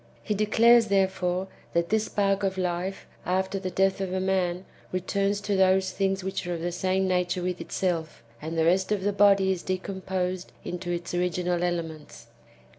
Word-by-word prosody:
He 210 - -1
declares, 225 +3 +5
therefore, 190 -2 +1 0.3
that 170 0 +1
this 220 0 +2
spark 195 -1 +1
of 190 -1 -1
life, 180 +1 -2 0.2
after 190 +2 -1
the 185 -1 -3
death 195 +2 +1
of 190 -1 -2
a 185 - -1
man, 185 -1 0 0.3
returns 195 +2 0
to 205 0 -1
those 190 0 +3
things 195 0 -1
which 190 -1 -3
are 175 - -1
of 165 - -6
the 175 +1 -2
same 190 +2 0
nature 180 0 0
with 180 0 -2
itself, 165 -8 -2 0.2
and 160 +2 -4
the 160 - +3
rest 185 +4 +2
of 205 -3 0
the 205 +1 +1
body 195 -1 +5
is 185 -2 -2
decomposed 185 -1 -3
into 180 0 -5
its 175 0 -3
original 180 0 0
elements. 165 -3 -4
185 Hz, 180 wpm, -27 LUFS, 175-195 Hz, 0.3 s, declares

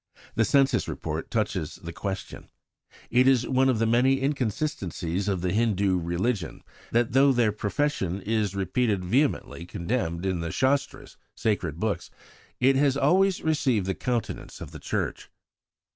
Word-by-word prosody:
The 115 - +2
Census 135 +1 +3
Report 80 +1 -4
touches 100 -8 -1
the 85 -2 -9
question: 95 +2 -6 0.6
"It 125 +2 +4
is 130 -3 +4
one 130 0 +3
of 125 - +2
the 115 - +1
many 125 +4 +3
inconsistencies 105 - -2
of 95 -3 0
the 90 0 -1
Hindu 100 -4 +2
religion, 85 +3 -2 0.3
that 120 0 +2
though 135 +3 +5
their 120 -4 +3
profession 105 - -1
is 105 -1 -1
repeatedly 100 0 0
vehemently 125 - 0
condemned 85 -2 -2
in 95 -2 0
the 85 0 -3
Shastras 135 +1 -1 0.2
(sacred 85 -8 -1
books), 110 0 -2 0.5
it 135 +2 +4
has 140 0 +3
always 190 +4 +3
received 135 -10 +1
the 95 - 0
countenance 120 +1 -3
of - - -8
the - - -9
Church." - - -3
110 Hz, 145 wpm, -26 LUFS, 95-130 Hz, 0.6 s, though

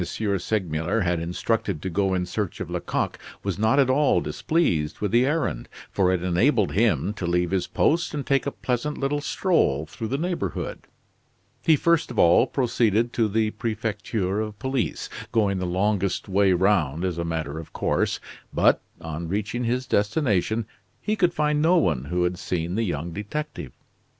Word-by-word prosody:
Segmuller 95 -1 -1
had 90 -2 +1
instructed 90 +2 -1
to 95 - -5
go 95 +1 +1
in 90 -1 0
search 100 +1 -3
of - - -5
Lecoq - - -2 0.2
was 100 -1 -2
not 110 +5 +3
at 140 -2 +5
all 130 -6 +3
displeased 80 - 0
with 105 -2 -1
the 120 +2 +4
errand; 150 - -1 0.2
for 95 -2 +2
it 90 -2 0
enabled 100 +5 +2
him 105 0 +2
to 90 -4 -4
leave 90 0 +1
his 95 -2 0
post 170 +2 +1
and 145 - -3
take 140 0 +1
a - - 0
pleasant 130 +4 -2
little 145 +1 -1
stroll 145 - +1
through 110 +8 -6
the 135 - -1
neighborhood. 175 +3 -3 0.7
He 160 - +5
first 170 +2 +2
of 120 - -7
all 85 +9 +5
proceeded 120 -3 +1
to 115 -2 +2
the 110 +1 +1
Prefecture 105 -3 -2
of 105 -1 -5
Police, 130 +2 -2 0.2
going 100 -4 +2
the 90 - -2
longest 95 +1 0
way 100 0 +3
round 90 -4 +2
as 90 -2 -2
a - - 0
matter 80 -2 -3
of 80 - -10
course, - - 0 0.3
but, - - +3 0.2
on 80 +1 -5
reaching 105 +6 -2
his 125 +2 0
destination, 110 - +1 0.3
he 215 - -1
could 180 -4 +2
find 150 -2 +1
no 170 +3 +4
one 75 - +1
who 90 +4 0
had 90 +1 -1
seen 85 -1 -2
the 110 - 0
young 85 -1 -3
detective. 105 - -5
105 Hz, 175 wpm, -25 LUFS, 90-125 Hz, 0.7 s, at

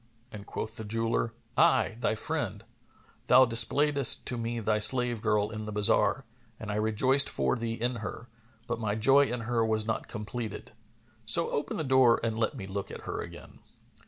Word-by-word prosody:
and 100 -2 -10
quoth 110 +1 -5
the 110 - -6
jeweller, 115 +1 -2 0.2
"I, 165 -8 +2
thy 115 -2 0
friend; 115 - -4 0.6
thou 130 +1 +6
displayedst 140 +3 +3
to 125 - -1
me 115 0 -4
thy 105 -1 0
slave 120 0 +3
girl 105 -1 0
in 110 -1 -6
the 105 - -6
bazar, 105 0 +1 0.3
and 110 -1 -6
I - - -3
rejoiced 130 +6 +2
for 65 -1 -1
thee 115 -1 -4
in 120 +1 -3
her, 115 +2 -7 0.4
but - - -4
my 105 -2 -2
joy 135 +6 +4
in 125 -3 -4
her 115 0 -1
was 110 -1 0
not 110 - -3
completed; 110 0 -7 0.6
so 165 +10 +5
open 145 - -3
the 160 - -2
door 130 -3 +4
and 115 -1 -1
let 110 - -1
me 95 - -7
look 100 0 -6
at - - -9
her - - -5
again." - - -11
115 Hz, 185 wpm, -28 LUFS, 110-125 Hz, 0.6 s, thou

